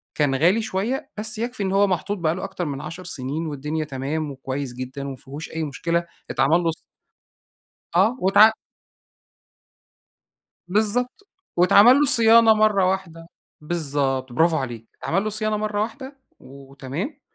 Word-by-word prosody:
كان 145 -3 +1
غالي 180 +10 +3
شوية، 220 +5 -3
بس 215 +2 -3
يكفِي 235 -2 -3
إن 190 - -1
هو 200 +1 +3
محطوط 190 +3 -2
بقى 165 -1 0
له - - -6
أكتر 190 -3 -4
من 140 -2 -4
10 165 +4 -8
سنين 150 0 -4
والدنيا 150 +2 -3
تمام 145 +2 -4
وكويس 135 -1 -5
جدًا 130 +2 -6
ومافيهوش 135 +3 -8
أي 160 0 -3
مشكلة، 170 +4 -2 0.3
اتعمل 145 +6 +3
له 165 - +1
ص 160 - -9 1.2
اه، 210 +8 +3
واتع 200 +4 +6 2.2
بالضبط. 245 - -1 0.3
واتعمل 200 +8 +7
له 295 - +4
صيانة 225 -2 +6
مرَّة 210 -3 +3
واحدة. 165 -4 -5 0.3
بالضبط، 140 -5 -2
برافو 160 +4 +3
عليك، 120 -5 -5
اتعمل 195 +5 0
له 215 - -2
صيانة 215 0 -1
مرَّة 210 -1 -2
واحدة 265 +5 -7 0.2
وتمام. 140 - -7
170 Hz, 140 wpm, -23 LUFS, 140-210 Hz, 2.2 s, واتعمل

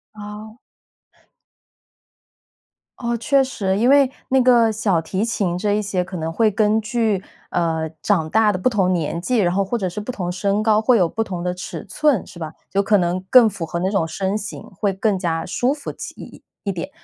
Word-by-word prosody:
哦。 210 +1 -9 2.4
哦， 235 -1 -1
确 275 +3 +3
实。 195 -7 -1
因 240 +4 +3
为 275 -1 +6 0.2
那 265 0 +4
个 240 -3 +5
小 205 -6 +1
提 190 +6 -2
琴 195 -6 -1
这 205 +2 0
一 210 - +1
些 195 -3 -1
可 185 +1 -9
能 160 0 -3
会 220 +5 +3
根 215 +1 +2
据， 220 -3 0 0.3
呃， 160 -2 -1
长 165 -7 +1
大 220 +3 +4
的 - - -1
不 255 - +2
同 190 -5 +1
年 170 -1 -1
纪， 250 +5 0
然 175 -4 +2
后 195 0 +1
或 235 +5 -1
者 190 -4 -2
是 195 +4 -6
不 210 +5 -4
同 180 -4 -3
身 200 +3 0
高， 215 -1 +4
会 245 +1 +4
有 175 -5 +2
不 225 - -3
同 180 -5 -5
的 180 0 -1
尺 180 - -7
寸， 295 -9 +1
是 175 - -13
吧？ 160 -2 -6 0.2
有 200 - +3
可 205 +1 +3
能 180 0 0
更 245 -4 +7
符 180 -4 -5
合 170 +2 -4
那 185 +2 0
种 195 -6 +1
身 190 +5 -2
形， 210 -1 -7 0.2
会 200 -2 +1
更 195 0 0
加 165 -3 -1
舒 250 +3 0
服 290 -1 -6
起 - - -8
一 - - -10
一 - - -13 0.3
一 - - +2
点， 180 - -5
205 Hz, 230 characters per minute, -21 LUFS, 180-225 Hz, 2.4 s, 更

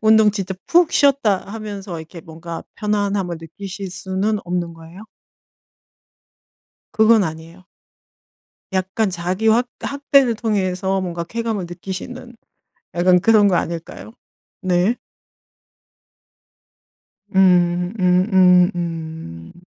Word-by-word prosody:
'운동 220 -1 +5
진짜 195 -2 -4
푹 345 -1 +4
쉬었다.' 275 -9 +3
하면서 205 -5 -6
이렇게 165 +2 -11
뭔가 165 +1 -8
편안함을 200 -4 -1
느끼실 195 +4 -8
수는 190 +3 -2
없는 175 -1 -3
거예요? 165 +4 -13 1.9
그건 220 -1 +4
아니에요. 165 +2 -7 1.1
약간 190 +3 0
자기 185 +4 -2
확 235 +3 +3
학대를 280 -3 +2
통해서 195 -3 -1
뭔가 175 -2 -4
쾌감을 225 0 -3
느끼시는 195 +8 -8 0.6
약간 180 +1 +4
그런 210 +1 +5
거 180 - +2
아닐까요? 170 +7 -5 0.5
네. 185 +5 +2 2.4
음. 180 0 +3
음음 180 0 +4
음. 160 - -6
190 Hz, 215 characters per minute, -20 LUFS, 175-215 Hz, 2.4 s, 운동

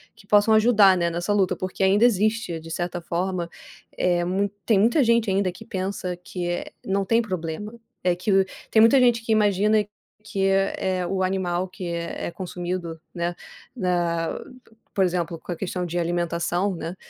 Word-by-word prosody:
que - - -18
possam 210 +2 +5
ajudar, 215 -4 +6
né, 170 -1 0
nessa 175 +4 -2
luta, 200 -3 +2
porque 185 +1 -3
ainda 195 +3 +4
existe, 215 -5 +1
de 165 +1 -10
certa 175 +1 -3
forma, 175 +1 -2 0.5
eh, 175 -1 +1
mui 195 +3 0 0.2
tem 215 -4 +4
muita 235 +8 +4
gente 230 -2 +3
ainda 190 -1 +1
que 180 - -12
pensa 185 -1 -4
que, 180 0 -5
eh, 175 0 -3
não 195 0 0
tem 230 +3 +3
problema, 185 -1 -4 0.3
é 180 -1 +2
que, 185 +4 -2 0.4
tem 220 - +5
muita 230 +5 +6
gente 240 -2 +4
que 230 - -2
imagina 210 0 +3 0.4
que 205 -3 -1
é 195 -1 0
o 190 +1 -1
animal 185 -1 -1
que 185 0 -8
é 170 0 -4
é - - -5
consumido, 175 -1 -5
né, 170 0 -2 0.4
na 175 -5 -1 0.5
por 195 - +2
exemplo, 170 -2 -2
com - - -8
a - - -2
questão 180 0 -3
de 175 0 -4
alimentação, 175 +2 -1
né, 170 +1 -5
185 Hz, 175 wpm, -24 LUFS, 175-205 Hz, 0.5 s, ajudar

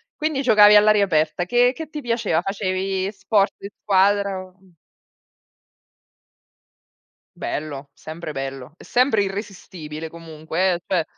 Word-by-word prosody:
Quindi, 305 -3 -1
giocavi 210 -4 +6
all'aria 210 -1 +5
aperta, 160 0 0
che 245 +5 +3
che 315 +2 -8
ti 300 -1 -6
piaceva? 230 -9 0
Facevi 190 0 -2
sport 195 0 +1
di 200 - -9
squadra 200 0 +2
o, 185 0 -21
mhmm 185 -3 -25 2.6
Bello, 145 -2 -5
sempre 155 +1 -8
bello, 135 0 -6
è - - -15
sempre 240 -5 +2
irresistibile 180 -6 -7
comunque 165 +2 -2
eh, 170 - -5
cioè 175 -4 0
190 Hz, 125 wpm, -22 LUFS, 160-210 Hz, 2.6 s, giocavi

